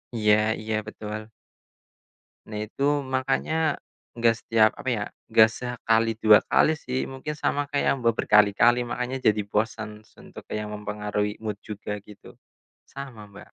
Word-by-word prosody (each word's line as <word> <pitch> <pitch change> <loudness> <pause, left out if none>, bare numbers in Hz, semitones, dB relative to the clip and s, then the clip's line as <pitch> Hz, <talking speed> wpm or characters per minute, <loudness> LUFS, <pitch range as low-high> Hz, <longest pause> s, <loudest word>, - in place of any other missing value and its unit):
Iya 105 -1 +4 0.3
iya, 110 0 -2
betul. 110 0 -7 1.2
Nah 105 -1 -6
itu, 140 - -5 0.3
makannya 145 +4 0 0.4
enggak 115 -1 +3
setiap, 110 -1 +4
apa 130 - -4
ya, 105 -3 -1 0.3
enggak 110 0 +7
sekali, 115 -1 0
dua 110 -1 +8
kali 155 - +4
sih. 130 -2 -3
Mungkin 135 +3 -5
sama 145 -1 0
kayak 140 -1 +1
Mbak 115 -1 +3
berkali-kali, 105 +4 +4
makannya 125 +2 -3
jadi 105 -1 +3
bosan 105 0 -3
untuk - - -14
yang 105 0 -3
mempengaruhi 105 0 -3
mood 105 -2 -4
juga, 105 0 -5
gitu. 105 -1 -15 0.5
Sama 130 -7 -9
Mbak. 100 0 -13
110 Hz, 135 wpm, -25 LUFS, 105-125 Hz, 1.2 s, dua